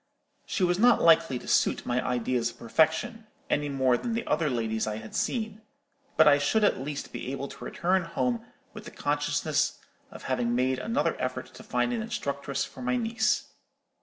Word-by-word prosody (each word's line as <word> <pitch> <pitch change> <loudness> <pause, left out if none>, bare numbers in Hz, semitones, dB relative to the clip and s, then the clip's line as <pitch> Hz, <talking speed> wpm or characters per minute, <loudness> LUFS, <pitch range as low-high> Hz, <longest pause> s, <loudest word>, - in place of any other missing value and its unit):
She 195 - -1
was 175 +1 +2
not 240 +2 +5
likely 165 -5 +5
to - - -11
suit - - +2
my 125 0 0
ideas 125 -1 0
of 120 - -13
perfection, 160 - +1 0.2
any 145 0 +1
more 130 -3 +2
than 235 - -3
the 230 +1 -2
other 160 -3 +1
ladies 110 -3 -1
I 105 - -2
had 110 0 -10
seen; 220 -3 -2 0.6
but 155 - +7
I 145 -1 +6
should 180 +10 +2
at 205 - +3
least 145 +1 -5
be 130 - -5
able 140 0 -4
to - - -11
return 185 +1 0
home 125 -7 -1 0.3
with - - -10
the - - -7
consciousness - - 0 0.3
of - - -11
having 120 -2 0
made 130 +1 +1
another 230 +6 0
effort - - -4
to - - -11
find 245 - 0
an 230 - -1
instructress 140 - -3
for - - -12
my 250 0 0
niece. 225 -2 +1
145 Hz, 190 wpm, -28 LUFS, -, 0.6 s, but